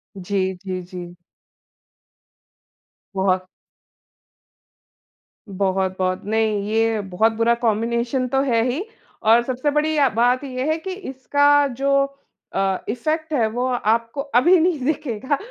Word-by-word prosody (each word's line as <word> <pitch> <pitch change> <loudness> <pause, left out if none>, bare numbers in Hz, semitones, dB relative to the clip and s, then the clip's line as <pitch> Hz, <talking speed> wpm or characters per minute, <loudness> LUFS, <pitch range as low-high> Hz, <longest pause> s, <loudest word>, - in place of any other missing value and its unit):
जी, 190 0 -1
जी, 185 -1 -3
जी। 175 -1 -9 2.0
बहुत। 185 -1 +1 2.0
बहुत-बहुत, 190 -1 -1
नहीं 215 -1 +1
ये 225 0 +1
बहुत 200 +3 +1
बुरा 230 +1 +2
कॉम्बिनेशन 235 +3 0
तो 270 +2 +1
है 230 -4 +2
ही। 280 +10 -2 0.4
और 225 +2 +6
सबसे 260 +4 -1
बढ़िया 300 -1 +2
बात 245 +4 +2
ये 260 -1 -4
है 315 - 0
कि 375 +4 -6
इसका 285 -3 +2
जो 275 0 +3 0.5
अ, 195 -1 +1
इफेक्ट 310 +7 -2
है 235 -6 +2
वो 245 +3 -1
आपको 230 +1 0 0.2
अभी 350 +7 +5
नहीं 335 -2 +1
दिखेगा 275 -2 -1
235 Hz, 115 wpm, -21 LUFS, 200-275 Hz, 2.0 s, और